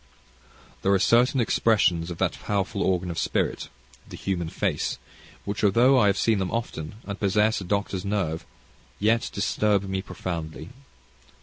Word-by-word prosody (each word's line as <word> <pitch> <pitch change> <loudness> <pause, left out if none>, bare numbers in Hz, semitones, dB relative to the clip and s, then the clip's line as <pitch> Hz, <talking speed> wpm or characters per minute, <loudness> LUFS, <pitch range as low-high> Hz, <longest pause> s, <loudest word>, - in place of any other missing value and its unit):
There 95 - +2
are - - +5
certain 120 +7 +3
expressions 100 -7 +2
of 85 - -6
that - - +1
powerful 100 -2 -2
organ 90 -1 0
of 85 - -3
spirit - - -1 0.4
the - - -8
human 85 -4 -2
face - - -1 0.5
which, 100 +1 -3
although 120 +6 +5
I 105 - +4
have 100 -1 +2
seen 110 -3 +2
them 95 -1 -1
often, 105 -8 -4
and 100 -1 -6
possess 105 +2 +2
a - - -6
doctor's 100 -1 -1
nerve, 95 -6 -1 0.6
yet 110 +3 +2
disturb 105 -2 +1
me 95 -1 -2
profoundly. 85 -3 -6
100 Hz, 150 wpm, -25 LUFS, 90-105 Hz, 0.6 s, are